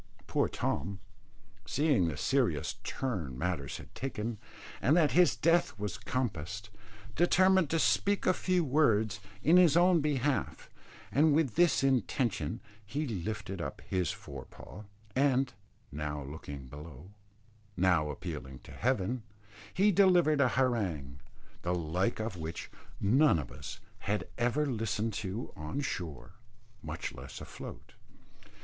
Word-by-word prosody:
Poor - - +1
Tom, 95 +6 -2 0.6
seeing 140 - +2
the 80 - -3
serious - - +1
turn 90 - -3
matters 70 -2 -2
had - - -12
taken, 115 -4 -4 0.4
and 145 +8 +4
that 155 -4 +4
his 180 0 +5
death 165 -7 +2
was 105 +2 -4
compassed, 105 - -3 0.4
determined 185 0 +4
to 165 - +1
speak 200 +5 +2
a 185 - +5
few 185 -1 +1
words 110 -8 +2 0.2
in 165 +5 +6
his 170 -3 +6
own 175 0 +5
behalf; 145 -2 -1 0.4
and 150 +1 +4
with 150 -7 +2
this 175 -4 +4
intention 120 - 0 0.2
he 140 +9 -3
lifted 105 - -4
up - - -5
his 90 -4 0
fore 70 -1 -8
paw, 105 - -12 0.3
and, 135 -2 +2 0.4
now 75 0 -4
looking 70 -1 -8
below, 75 +5 -11 0.7
now 85 -5 +3
appealing 75 -4 -6
to - - -14
heaven, 120 0 0 0.5
he 205 +3 +4
delivered 175 -6 +5
an 130 - +4
harangue, 95 - 0 0.4
the 90 +1 0
like 90 +7 0
of 110 -3 -3
which 80 0 -6 0.3
none 130 - +4
of 70 -6 -5
us - - -8 0.2
had 105 +1 -2
ever 120 +5 +2
listened 115 -3 -1
to 100 +3 -4
on 75 - -4
shore, 85 - -4 0.5
much - - -5
less - - -9
afloat. - - -9
110 Hz, 130 wpm, -31 LUFS, 85-145 Hz, 0.7 s, in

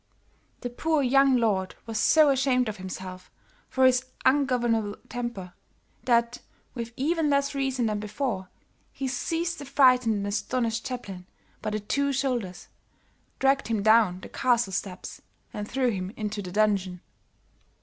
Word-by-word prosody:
The 245 - -4
poor 310 +3 0
young 270 0 +4
lord 200 -5 0
was 225 -1 -3
so 310 -2 +5
ashamed 260 -2 +2
of 215 -1 -4
himself 185 -1 -8 0.4
for 260 -1 +3
his 255 0 +4 0.2
ungovernable 240 -6 +2
temper, 235 -7 -5 0.5
that, 235 -1 +2 0.3
with 235 -2 -5
even 315 +3 +1
less 280 0 +1
reason 265 -3 -1
than 210 -1 -1
before, 210 -2 -3 0.4
he 270 - -4
seized 330 +6 -2
the 285 - -7
frightened 255 -4 +4
and 200 -1 -2
astonished 230 +2 -1
chaplain 195 -8 -7 0.3
by - - -2
the 215 0 -2
two 280 +7 0
shoulders, 250 -9 -2 0.7
dragged 275 +1 +2
him 220 -3 -1
down 215 -4 +4
the - - -10
castle 240 -6 +1
steps 185 0 -5 0.3
and 210 0 -5
threw 255 -2 +1
him 185 -3 -3
into 210 -1 -3
the 180 -2 -7
dungeon. 195 -3 +1
235 Hz, 145 wpm, -27 LUFS, 205-265 Hz, 0.7 s, so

